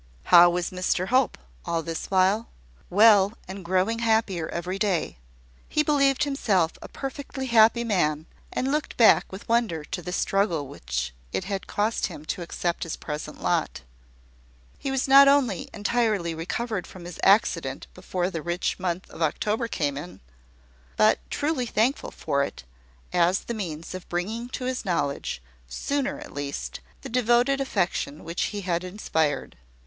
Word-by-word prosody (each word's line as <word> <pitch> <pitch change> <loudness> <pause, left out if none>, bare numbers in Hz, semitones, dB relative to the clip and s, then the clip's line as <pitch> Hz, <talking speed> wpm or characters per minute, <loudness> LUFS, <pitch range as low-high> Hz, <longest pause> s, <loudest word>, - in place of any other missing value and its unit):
How 175 0 +10
was 175 0 -1
Mr 185 0 -1
Hope, 255 +1 +2 0.3
all 170 -1 -1
this 165 0 -4
while? 195 +4 +2 0.4
Well, 205 0 +6
and 190 +1 -7
growing 190 +6 +1
happier 220 -7 +1
every 180 +3 -4
day. 190 - 0 0.5
He 300 - +2
believed 275 -2 +3
himself 210 - +1
a - - -8
perfectly 270 0 -5
happy 235 -1 +5
man, 155 -9 0 0.3
and 265 +1 -1
looked 300 +1 -2
back 230 - +5
with 190 +1 -9
wonder 230 -9 +1
to 180 +4 -5
the 180 - -6
struggle 180 -6 0
which - - -4 0.2
it - - -2
had 195 0 -4
cost 215 +2 0
him 150 - -10
to - - -9
accept 170 0 -2
his 165 - -3
present 150 0 -6
lot. - - 0 1.0
He 275 - -3
was 270 0 0
not 275 +1 +9
only 270 -10 +2
entirely 210 -5 0
recovered 190 +5 -3
from 180 -2 -11
his 175 -1 -9
accident 200 +3 +2
before 180 0 -2
the 165 - -4
rich 175 +4 -2
month 180 0 -2
of - - -10
October 210 - 0
came 145 -10 -1
in, 175 +4 -9 0.8
but 215 0 +4
truly 290 -4 -1
thankful 230 +6 +1
for 140 - -1
it 100 - -6 0.5
as 180 +2 +3
the 235 - -5
means 170 -7 -5
of 185 -1 -8
bringing 220 +8 -3
to 255 - -5
his 255 0 -2
knowledge, 140 - -2 0.2
sooner 280 - -2
at 300 +1 -10
least, 140 - -5 0.2
the - - -7
devoted 245 +3 +2
affection 185 - -1
which 170 +2 -2
he 205 -1 -4
had 175 -2 -1
inspired. 160 -6 -1
190 Hz, 155 wpm, -26 LUFS, 170-235 Hz, 1.0 s, How